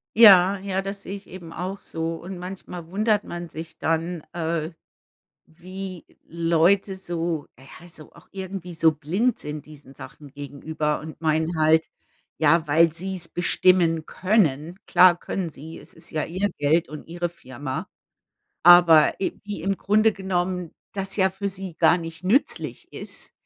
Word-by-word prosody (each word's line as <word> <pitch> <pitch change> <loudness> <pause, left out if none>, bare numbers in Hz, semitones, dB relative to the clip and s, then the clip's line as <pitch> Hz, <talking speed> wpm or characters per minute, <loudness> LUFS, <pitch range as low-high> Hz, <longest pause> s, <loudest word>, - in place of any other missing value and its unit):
Ja, 195 -3 +8
ja, 195 0 -2
das 195 0 -6
sehe 195 +1 -6
ich 200 - -11
eben 175 -3 -10
auch 190 +2 -5
so. 165 0 -4
Und 185 +2 -8
manchmal 180 -2 -8
wundert 210 +3 +1
man 175 -1 -7
sich 160 +2 -9
dann, 165 +1 -1
äh, 165 -1 -2 0.8
wie 185 +2 -9 0.2
Leute 170 +4 +2
so 170 -4 -3
ja, 160 +6 -14
so 155 -2 -15
auch - - -19
irgendwie 190 -2 -6
so 160 -1 +3
blind 185 - -1
sind 150 -1 -6
diesen 145 -3 -14
Sachen 145 +1 -12
gegenüber 150 +2 -3
und 155 -1 -10
meinen 160 +1 0
halt, 160 +1 +4 0.5
ja, 160 +1 +3
weil 160 +2 +4
sie's 180 0 -3
bestimmen 175 -2 +2
können. 180 -4 0
Klar 180 -1 +6
können 180 -4 -3
sie, 155 +3 -10
es - - -11
ist 165 +1 -8
ja 155 - -1
ihr 190 +4 -1
Geld 155 +3 +2
und 155 +1 -10
ihre 175 0 -2
Firma. 130 -4 -7 0.8
Aber, 175 -3 +7
i - - -2
wie 205 -6 -6
im 195 +1 -1
Grunde 215 +2 +3
genommen 180 -3 -2 0.2
das 195 0 -3
ja 190 -1 +3
für 200 +1 -4
sie 190 -3 -6
gar 175 - +5
nicht 165 +1 -8
nützlich 235 +10 0
ist, - - -6
175 Hz, 155 wpm, -24 LUFS, 160-190 Hz, 0.8 s, Ja